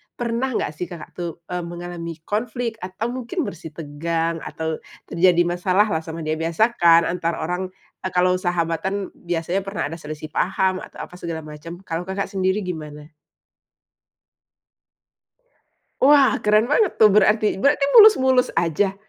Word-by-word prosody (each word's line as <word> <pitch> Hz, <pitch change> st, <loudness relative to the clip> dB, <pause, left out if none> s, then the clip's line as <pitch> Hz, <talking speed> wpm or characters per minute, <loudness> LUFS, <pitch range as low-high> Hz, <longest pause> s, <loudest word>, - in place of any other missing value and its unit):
Pernah 240 Hz, +2 st, -1 dB
nggak, -, -, -1 dB
sih, 180 Hz, -, -4 dB
Kakak 170 Hz, -2 st, -10 dB
tuh, 175 Hz, -1 st, -3 dB, 0.2 s
eee, 180 Hz, 0 st, -2 dB
mengalami 170 Hz, -1 st, -6 dB
konflik 230 Hz, +2 st, -3 dB
atau 190 Hz, +6 st, -4 dB
mungkin 260 Hz, +7 st, -3 dB
bersitegang, 165 Hz, -, -3 dB
atau 160 Hz, -1 st, -4 dB, 0.3 s
terjadi 175 Hz, 0 st, +4 dB
masalah 185 Hz, +4 st, +1 dB
lah 160 Hz, -, +1 dB
sama 160 Hz, 0 st, -7 dB
dia? 155 Hz, 0 st, -2 dB
Biasa, 170 Hz, +8 st, +1 dB
kan, 170 Hz, -1 st, +6 dB
antara 170 Hz, -1 st, -2 dB
orang, 180 Hz, +3 st, -2 dB, 0.3 s
eee, 185 Hz, -, -4 dB
kalau 180 Hz, 0 st, +3 dB
sahabatan 175 Hz, +2 st, -2 dB
biasanya 175 Hz, +2 st, -2 dB
pernah 195 Hz, +1 st, -4 dB
ada 165 Hz, -, -7 dB
selisih 155 Hz, 0 st, -8 dB
paham, 190 Hz, 0 st, 0 dB
atau -, -, -9 dB
apa -, -, -11 dB
segala 165 Hz, -2 st, -5 dB
macam, 165 Hz, +4 st, -10 dB
kalau 175 Hz, +1 st, -4 dB
Kakak 195 Hz, +1 st, -3 dB
sendiri 190 Hz, +1 st, 0 dB
gimana? 155 Hz, -3 st, -7 dB, 2.9 s
Wah, 280 Hz, -1 st, +6 dB
keren 210 Hz, +1 st, +3 dB
banget, 330 Hz, -, +1 dB
tuh, 215 Hz, -2 st, +7 dB
berarti. 210 Hz, 0 st, +3 dB
Berarti 280 Hz, 0 st, +3 dB
mulus-mulus 265 Hz, -, +7 dB
aja? 190 Hz, +4 st, +1 dB
180 Hz, 140 wpm, -22 LUFS, 165-210 Hz, 2.9 s, tuh